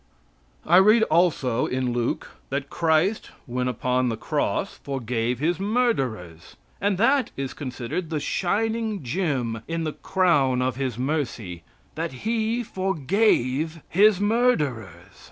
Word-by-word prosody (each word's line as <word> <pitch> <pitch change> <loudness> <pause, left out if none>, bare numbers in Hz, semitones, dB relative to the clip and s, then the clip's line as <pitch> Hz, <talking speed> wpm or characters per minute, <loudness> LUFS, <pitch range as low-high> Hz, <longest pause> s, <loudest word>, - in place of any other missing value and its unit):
I 175 - +5
read 215 +4 +6
also 150 -8 +2
in 125 -1 -1
Luke 120 -1 -2 0.2
that 140 0 -3
Christ 165 +5 +1 0.2
when 125 +1 -2
upon 125 +1 0
the 115 - -3
cross - - -2
forgave 125 -3 -2
His 165 +6 0
murderers, 135 - -1 0.3
and 200 -1 +1
that 265 +6 +3
is 135 -1 -3
considered 130 +4 -5
the 155 -2 -1
shining 215 +4 -1
gem 125 - -1
in 165 0 -2
the 155 -1 -2
crown 145 -9 +2
of 125 -1 0
His 130 -4 -3
mercy 125 - -3 0.3
that 160 -5 -5
He 225 +1 0
forgave 165 - 0
His 200 +2 +5
murderers. 150 - 0
150 Hz, 125 wpm, -24 LUFS, 125-195 Hz, 0.3 s, read